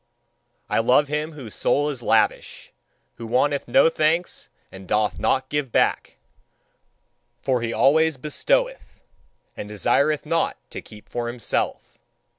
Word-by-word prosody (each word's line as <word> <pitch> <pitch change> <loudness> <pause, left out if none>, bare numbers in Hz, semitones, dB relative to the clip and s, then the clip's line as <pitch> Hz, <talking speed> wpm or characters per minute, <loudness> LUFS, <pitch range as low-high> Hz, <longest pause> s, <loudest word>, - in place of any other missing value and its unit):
I - - +1
love 130 +5 +3
him 150 +2 -2
whose 130 -8 -8
soul 145 +1 +1
is 130 -4 -7
lavish, 110 -2 0 0.4
who 115 - -7
wanteth 140 +4 +1
no - - +5
thanks 165 +2 0 0.2
and 95 -1 -12
doth 105 +2 0
not 130 0 +1
give 145 -3 -2
back: - - +1 1.2
for 130 -3 0
he 115 -1 -2
always 160 +4 +3
bestoweth, - - -1 0.5
and 105 - -7
desireth 140 +9 +1
not 165 +2 0
to - - -6
keep 105 -1 -15
for 120 -1 -4
himself. 120 -2 -3
140 Hz, 130 wpm, -23 LUFS, 115-155 Hz, 1.2 s, no